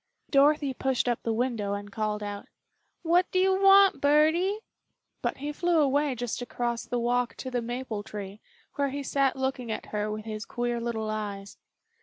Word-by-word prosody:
Dorothy 285 0 +4
pushed 260 -1 0
up 240 -1 0
the 230 - -1
window 220 -4 -1
and 205 0 -7
called 210 0 -2
out, 205 0 -6 0.6
"What 350 +2 +3
do - - -1
you 380 +1 +3
want, 390 0 +6
birdie?" 315 +8 +3 0.6
but - - -2
he 290 +2 -4
flew 345 +2 +1
away 285 -1 +2
just 245 0 -3
across 240 -1 -3
the 245 - -2
walk 245 +1 0
to 260 - -6
the 245 -1 0
maple 240 -2 -4
tree, 205 -1 -8 0.4
where 280 -1 +1
he 280 +1 -4
sat 275 0 +1
looking 265 -3 -2
at - - -4
her 210 0 -1
with 215 0 -5
his 215 -1 -5
queer 240 0 -2
little 220 -2 -2
eyes. 205 -2 -5
245 Hz, 180 wpm, -28 LUFS, 215-285 Hz, 0.6 s, want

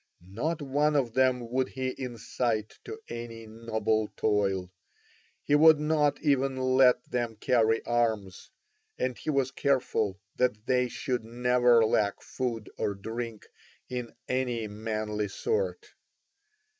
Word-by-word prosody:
Not 150 +8 -2
one 145 +2 +1
of 125 -5 +1
them 125 -2 +2
would 130 +1 +1
he 130 -1 -3
incite 115 -3 -3
to 440 0 -7
any 115 -1 -7
noble 110 -1 -1
toil, 95 -4 +1 0.7
he - - 0
would 155 +1 +7
not 150 -1 +2
even 135 -2 +2
let 130 -1 +4
them 120 -2 -1
carry 115 0 +2
arms, 110 -6 -1 0.5
and 130 -1 -1
he - - -6
was 135 -3 +1
careful 125 -8 0 0.2
that 110 -4 0
they 125 -1 +2
should 125 -1 -3
never 120 0 +3
lack 105 -2 +1
food 120 -4 -3
or 100 - -1
drink 115 +2 -6 0.4
in 125 -2 -5
any 125 -3 -1
manly 105 0 -3
sort. 440 - -2
120 Hz, 125 wpm, -29 LUFS, 110-130 Hz, 0.7 s, would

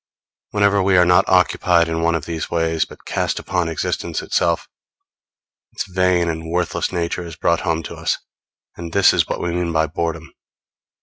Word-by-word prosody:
Whenever 100 -1 +2
we 95 -1 +3
are 90 - +6
not 90 +2 +4
occupied 90 -2 +3
in 80 0 -2
one 85 0 +2
of 80 -2 -3
these 80 -2 -4
ways, 80 -1 0
but - - -15
cast - - -1
upon 90 -3 -1
existence 80 - -3
itself, 85 -1 0 1.1
its - - -3
vain 90 -2 +1
and 80 0 -4
worthless 85 0 -1
nature 85 0 -2
is 85 -2 -8
brought 85 +1 +1
home 80 -1 -1
to - - -7
us; - - -1 0.6
and 85 -1 -8
this 100 -1 +5
is - - +2
what - - -3
we 90 - -2
mean 85 0 -1
by 80 -1 +2
boredom. 80 0 -4
85 Hz, 180 wpm, -20 LUFS, 80-90 Hz, 1.1 s, are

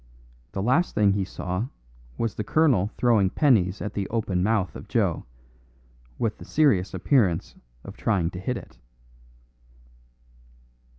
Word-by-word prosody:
The 95 - -2
last 130 - +2
thing 100 -2 +4
he 100 -1 0
saw 95 +3 -4 0.5
was 115 -2 -1
the 105 - -4
colonel 125 - +2
throwing 110 -6 +3
pennies 105 - +2
at 105 - -4
the 100 -2 -2
open 105 -6 -1
mouth 100 -5 0
of - - -9
Joe, - - 0 0.9
with 110 -3 -2
the - - -9
serious 105 -13 +2
appearance 95 - +1 0.3
of - - -10
trying 95 -6 0
to 90 - -7
hit 120 +7 -2
it. - - -13
105 Hz, 135 wpm, -25 LUFS, 95-120 Hz, 0.9 s, thing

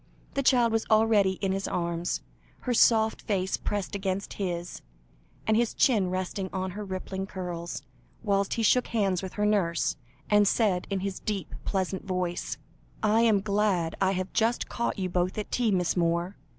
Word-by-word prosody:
The 275 - 0
child 245 -3 +4
was 225 0 0
already 215 -3 +4
in 195 - +2
his 195 0 -2
arms, 170 0 -2 0.4
her 250 - -1
soft 220 -1 +4
face 190 -2 0
pressed 205 -1 -3
against 195 -1 -2
his, 175 -2 -3 0.6
and 220 - +3
his 235 0 +1
chin 210 -9 +3
resting 185 +1 -3
on 190 0 -2
her 210 +3 -6
rippling 190 0 -4
curls, 175 -3 -5 0.4
whilst 200 -2 +1
he 230 - -1
shook 250 +3 +4
hands 195 -6 +1
with 190 -1 -6
her 210 - 0
nurse, 180 -8 +1 0.3
and 210 -1 +4
said 195 -5 +2
in 195 -2 -1
his 195 -1 -3
deep 200 -6 -4
pleasant 190 -1 -1
voice 180 -2 -2 0.5
"I 215 +1 +4
am 220 -4 +4
glad 200 -5 +1
I 190 0 +3
have 185 0 -3
just 230 +2 +1
caught 235 - -2
you 190 -2 -1
both 180 +1 -1
at 210 - -4
tea, 240 -2 +1
Miss 180 -4 +1
Moore. 170 +2 0
195 Hz, 175 wpm, -28 LUFS, 185-215 Hz, 0.6 s, child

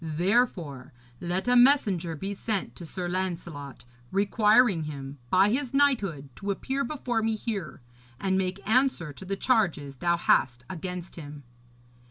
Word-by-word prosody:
Therefore, 165 - 0 0.3
let 180 +5 -2
a 250 - +4
messenger 205 - +4
be 195 +6 -4
sent 200 0 -3
to 170 - -9
Sir 180 +2 -4
Lancelot 170 -7 -4 0.3
requiring 205 -2 +3
him, 140 -2 -7
by 190 +2 +5
his 260 +3 -1
knighthood, 200 - +1
to 200 - -5
appear 265 +7 -1
before 245 -4 -2
me 225 0 +1
here, 210 - -5 0.4
and 190 -1 0
make 190 +1 -2
answer 225 - +2
to 190 - -11
the 195 +1 -3
charges 175 - +1
thou 170 +4 +1
hast 120 -7 +2
against 180 0 -6
him.' 145 -2 -9
190 Hz, 145 wpm, -27 LUFS, 160-220 Hz, 0.4 s, by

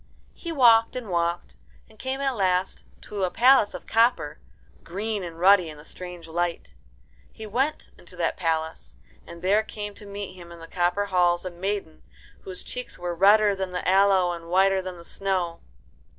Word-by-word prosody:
He 340 - -7
walked 235 -6 +5
and 245 -5 -5
walked, 170 0 -1 0.3
and 220 -1 -21
came 265 +1 -3
at 270 -2 0
last 185 -2 0 0.2
to 205 -2 -5
a 185 - +2
palace 250 0 +4
of - - -9
copper, 225 -10 +2 0.4
green 205 +3 -3
and 170 -2 -7
ruddy 185 -2 +5
in 155 - -10
the 150 - -14
strange 180 -2 -8
light. 170 - -3 0.6
He 220 - -9
went 265 +8 -2
into 180 +1 -14
that 170 -2 -1
palace, 160 -2 -3 0.3
and 170 +1 -11
there 200 +3 +4
came 210 -1 -7
to 205 0 -12
meet 200 -1 -6
him 175 -2 -12
in 170 - -10
the 165 - -10
copper 175 +4 0
halls 180 -2 +2
a 185 - -4
maiden 185 -2 -4 0.4
whose 185 -1 -7
cheeks 250 0 -6
were 175 0 -3
redder 205 +4 +5
than 190 -1 -4
the 180 - -3
aloe 190 -1 +4
and 170 -1 -7
whiter 190 +1 +3
than 185 -1 -7
the 170 - -13
snow. 185 -4 -2
185 Hz, 180 wpm, -25 LUFS, 175-210 Hz, 0.6 s, walked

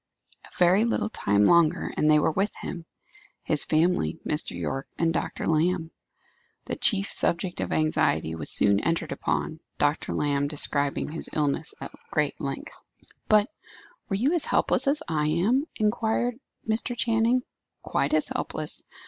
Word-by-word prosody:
A - - -15
very 180 +4 +5
little 230 -2 0
time 100 - +2
longer, 170 - +3
and 150 - +2
they 155 - +6
were 150 - +2
with 195 +6 -1
him 170 -2 -7 0.6
his 150 - +2
family, 160 - +1
Mr. 150 - -2
Yorke, 110 - -3
and 165 -1 +1
Dr. - - -3
Lamb. 165 +1 +1 0.7
The - - -3
chief 200 -1 +2
subject 175 +1 0
of - - -3
anxiety 80 - +1
was 80 -2 -5
soon 100 -1 +3
entered 165 +8 -1
upon, 160 - -2 0.2
Dr. 145 +1 0
Lamb 145 -1 0
describing 145 -1 0
his 165 - -4
illness 150 - -1
at - - -7 0.2
great - - -1
length. - - -5 0.5
"But 210 0 +5 0.6
were 195 - 0
you 255 - +1
as 345 - +1
helpless - - +1
as 300 +2 +1
I 150 -2 0
am?" 205 - +2
inquired 225 +3 0 0.3
Mr. 225 +2 -1
Channing. 230 +2 +2 0.4
"Quite - - 0
as - - +1
helpless. - - -4
170 Hz, 150 wpm, -26 LUFS, 150-215 Hz, 0.7 s, they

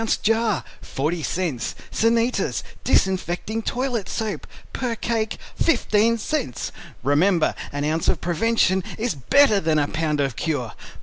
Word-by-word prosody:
jar, 225 -3 +2 0.2
40 160 +5 -2
Cents 160 -7 -2 0.2
"Sanitas" 230 +2 +1 0.2
Disinfecting 190 +3 +1
Toilet 245 -3 -2
Soap, 220 -2 -3 0.3
per 245 -3 -2
cake, 225 -1 -1 0.2
15 230 -8 +3
Cents 260 - -2 0.3
Remember 160 +5 +3 0.2
an 145 0 -3
ounce 155 +2 0
of - - +2
prevention 190 +1 +2
is 230 -2 0
better 215 - +4
than 160 -3 +1
a 145 -1 +2
pound 155 -1 -1
of 135 -4 0
cure. 125 -4 -2
190 Hz, 125 wpm, -23 LUFS, 155-230 Hz, 0.3 s, better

